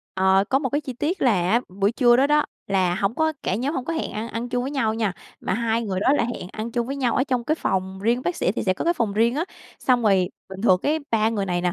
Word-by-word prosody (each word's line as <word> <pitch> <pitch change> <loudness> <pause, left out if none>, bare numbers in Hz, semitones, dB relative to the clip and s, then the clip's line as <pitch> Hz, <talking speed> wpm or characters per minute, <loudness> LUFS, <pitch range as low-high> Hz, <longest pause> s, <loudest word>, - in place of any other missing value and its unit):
Ờ, 190 +1 +4
có 270 - +4
một 270 -2 -2
cái 290 - 0
chi 270 -4 -6
tiết 310 +9 -2
là 250 -4 +5 0.2
á, 235 +3 +4 0.2
buổi 200 +3 +3
trưa 240 -1 +5
đó 270 +3 +4
đó, 300 0 +3 0.2
là 185 -3 +1
hổng 195 +4 0
có 315 0 +1
cả 185 - 0
nhóm 265 +8 -1
hổng 255 - -2
có 330 - -3
hẹn 320 - -3
ăn 220 +2 -4
ăn 235 +2 -4
chung 245 0 -1
với 270 - -3
nhau 230 -6 0
nha, 220 -4 0 0.3
mà - - -1
hai 230 +1 0
người 190 -4 -2
đó 265 - +3
là 290 - +2
hẹn 230 -6 -5
ăn 220 +2 -5
chung 235 -1 -1
với 275 +2 -4
nhau 250 -4 0
ở 260 - +2
trong 255 -4 -1
cái 310 - +1
phòng 190 -8 -2
riêng, 235 +4 +1
bác 355 - -2
sĩ 185 - +1
thì 235 - -3
sẽ 185 - +3
có - - -4
cái 340 +1 +2
phòng 225 -8 -1
riêng 230 +4 +2
á, 315 +4 0 0.3
xong 250 -2 +2
rồi 190 -4 +3 0.2
bình 190 +1 -8
thường 185 -5 +5
cái 310 +2 +1
ba 220 -1 +3
người 205 -3 -2
này 175 -1 0
nè, 180 -1 0
235 Hz, 300 wpm, -23 LUFS, 195-265 Hz, 0.3 s, là